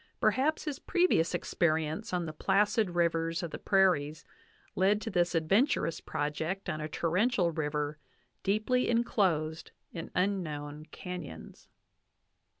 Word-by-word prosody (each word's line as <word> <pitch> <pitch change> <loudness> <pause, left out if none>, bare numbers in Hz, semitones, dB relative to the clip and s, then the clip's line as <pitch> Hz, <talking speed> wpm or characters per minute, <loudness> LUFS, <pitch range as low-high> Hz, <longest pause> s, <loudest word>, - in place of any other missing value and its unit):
Perhaps 300 +4 +2
his 295 -3 -4
previous 350 - +2
experience 160 +4 0
on 180 -2 -1
the 155 - -5
placid 200 +2 +1
rivers 165 0 +1
of 170 - -4
the - - -6
prairies 165 -6 +2 0.5
led 195 +3 +3
to 220 - -5
this 175 -1 +1
adventurous 165 - +2
project 160 +5 -3
on 155 - -4
a 155 - -3
torrential 180 +3 +1
river 150 -1 -2 0.4
deeply 215 +5 +1
inclosed 180 -9 +1 0.2
in 165 -2 -6
unknown 155 -6 -2
canyons. 180 - -8
175 Hz, 120 wpm, -31 LUFS, 155-205 Hz, 0.5 s, led